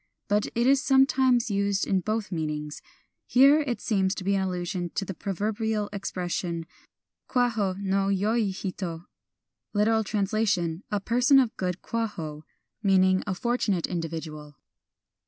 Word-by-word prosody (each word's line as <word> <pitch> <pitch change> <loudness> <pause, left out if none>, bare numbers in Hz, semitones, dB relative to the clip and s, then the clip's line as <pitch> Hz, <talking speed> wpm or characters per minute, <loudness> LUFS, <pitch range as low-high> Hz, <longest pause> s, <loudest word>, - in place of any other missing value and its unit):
But 205 0 +1
it 235 +1 +2
is 270 +1 +4
sometimes 265 -3 +3
used 200 0 +1
in 190 - +1
both 215 +2 -2
meanings. 150 -3 -4 0.5
Here 280 +4 +6
there 250 -4 -1
seems 195 -3 0
to 190 - -6
be 200 +2 +1
an 195 - +1
allusion 180 -1 -2
to 195 - -1
the 190 - -5
pro 200 +3 -5
verbial 210 +2 -1
expression, 175 -3 -3 0.6
Kwaho 225 -7 +1
no 195 0 0
yoi 205 +3 +1
hito 185 -3 -5 0.7
(lit.: 210 0 +2
a 210 -3 0
person 250 +6 +4
of 245 -4 +1
good 180 -1 -3
Kwaho), 170 -10 -4 0.4
meaning 190 -2 +4
a 190 - -1
fortunate 210 -5 0
individual. 160 -4 -5
200 Hz, 135 wpm, -27 LUFS, 180-225 Hz, 0.7 s, Here